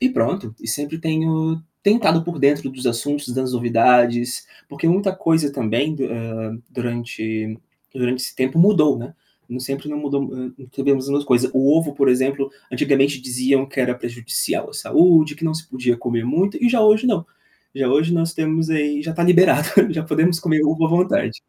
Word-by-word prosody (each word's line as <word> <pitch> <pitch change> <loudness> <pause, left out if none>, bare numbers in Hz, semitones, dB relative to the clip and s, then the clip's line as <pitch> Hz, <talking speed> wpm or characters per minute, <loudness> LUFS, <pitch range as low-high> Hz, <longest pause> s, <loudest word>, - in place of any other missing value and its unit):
e 260 - +3
pronto, 185 - -2
e - - -10
sempre 145 +6 -3
tenho 160 0 -1 0.2
tentado 200 -6 +3
por 170 -2 -5
dentro 140 0 +2
dos 130 0 -7
assuntos, 145 +5 -2
das 130 -1 -2
novidades, 120 0 +2 0.2
porque 140 +3 -4
muita 190 +2 +1
coisa, 160 -5 +1
também, 130 +4 -1
eh, 115 -3 -4 0.2
durante 110 -3 -5 0.4
durante 125 0 -1
esse - - -5
tempo 130 +4 -1
mudou, 170 -6 +4
né. 120 +2 -9 0.5
Sempre 135 +3 -5
não 150 - -4
mudou 140 -1 -2 0.4
não 135 - -14
sabemos 135 -1 0 0.2
coisa. 130 -1 +2
O 135 +2 +4
ovo 150 -3 -3
por 140 -1 +2
exemplo, 135 +2 0 0.2
antigamente 135 +2 +1
diziam 130 +1 0
que 135 0 -4
era 125 -1 0
prejudicial 120 -1 -4
à - - -12
saúde, 160 -4 +4
que 160 +2 -8
não 155 - 0
se 160 0 -7
podia 125 -2 0
comer 120 -1 -3
muito 185 +10 0
e 245 - +5
já 235 -2 +2
hoje 215 +3 +4
não. 200 -9 +1 0.5
Já 135 -1 -1
hoje 155 +6 +2
nós 165 -1 0
temos 160 0 -1
aí, 150 -2 0
já 160 - -5
está 170 +1 -2
liberado, 175 -3 +4 0.2
já 160 -1 -2
podemos 165 +1 +1
comer 160 -4 +1
ovo 160 +2 +1
à - - -2
vontade. 180 - 0
145 Hz, 180 wpm, -20 LUFS, 125-160 Hz, 0.5 s, e